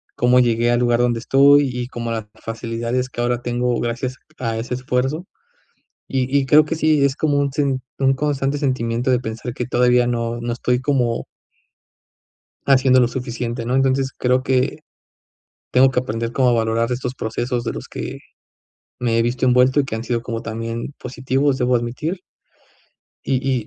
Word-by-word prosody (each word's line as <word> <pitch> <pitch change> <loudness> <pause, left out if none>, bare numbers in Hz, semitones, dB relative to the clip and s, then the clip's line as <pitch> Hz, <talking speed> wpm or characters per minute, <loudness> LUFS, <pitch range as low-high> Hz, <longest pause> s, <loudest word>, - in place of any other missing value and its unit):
cómo 125 +1 +4
llegué 120 -1 +2
al 120 - +2
lugar 120 -1 +2
donde 120 -1 +1
estoy, 140 +3 +5
y 125 0 -4
cómo 115 -2 -5
las 110 -2 -3 0.2
facilidades 115 +2 -3
que 120 - -5
ahora 120 0 0
tengo 120 0 -1
gracias 120 +2 -3 0.2
a 115 -3 -2
ese 115 +2 -4
esfuerzo. 130 +6 -1 0.8
Y 130 0 -1
y 135 - -1
creo 150 +3 +7
que 165 - -2
sí, 155 -2 +2
es 140 -1 +2
como 145 -2 +1
un 140 -1 0
sin 135 -2 0 0.2
un 135 0 +3
constante 140 0 -1
sentimiento 125 -3 -1
de 125 - +3
pensar 115 0 -5
que 125 - -3
todavía 125 0 +3
no 120 -1 -2
no 120 0 -2
estoy 125 +1 0
como 125 -5 0 1.4
haciendo 130 -1 +5
lo 120 - +3
suficiente, 120 -2 -4
¿no? 125 - -1
Entonces 135 0 +1
creo 125 +1 +1
que 130 -1 0 0.9
tengo 130 +1 +5
que 130 - 0
aprender 115 -1 -4
como 130 -1 +3
a 120 - +3
valorar 115 +1 0
estos 125 +1 -3
procesos 120 +2 -2
de 115 - -2
los - - -7
que - - -6 0.8
me 115 -2 +1
he - - +4
visto 120 +3 0
envuelto, 125 +2 +4
y 140 - +2
que 110 - -4
han 110 - -4
sido 120 -1 -1
como 115 -2 -4
también 115 +3 -5
positivos, 130 +2 0
debo 125 0 +2
admitir. 130 +10 -3 1.1
Y 130 -3 0
125 Hz, 175 wpm, -20 LUFS, 120-135 Hz, 1.4 s, creo